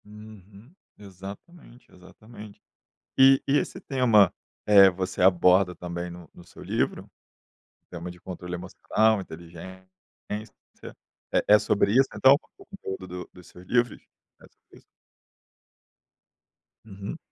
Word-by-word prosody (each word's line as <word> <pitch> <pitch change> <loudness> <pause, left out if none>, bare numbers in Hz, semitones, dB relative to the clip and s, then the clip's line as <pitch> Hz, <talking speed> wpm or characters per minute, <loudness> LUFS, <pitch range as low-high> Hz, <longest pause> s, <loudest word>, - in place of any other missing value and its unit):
Uhum. 105 - -15 0.2
Exatamente, 100 - -13
exatamente. 105 +3 -15 0.6
E 135 0 +6
e 140 +1 +3
esse 190 - -3
tema, 125 - +3 0.3
eh, 100 -2 +7
você 95 0 -4
aborda 90 0 +4
também 85 0 -6
no 85 -1 -12
no 85 - -15
seu - - -14
livro? - - -2 0.8
Tema 90 0 -7
de 90 - -16
controle 90 -1 -7
emocional, 110 +4 0
inteligência 85 +2 -11 1.5
é - - +2
é 105 0 +7
sobre 100 -1 +1
isso, 135 +2 +4
então, 135 +1 +6 0.2
o - - -15
conteúdo 95 - -8
do 90 0 -8
dos 90 -2 -16
seus 90 - -15
livros? 120 +3 0 0.4
É - - -16
sobre - - -23
isso? - - -27 2.0
Uhum. 100 +6 -8
95 Hz, 120 wpm, -25 LUFS, 90-110 Hz, 2.0 s, eh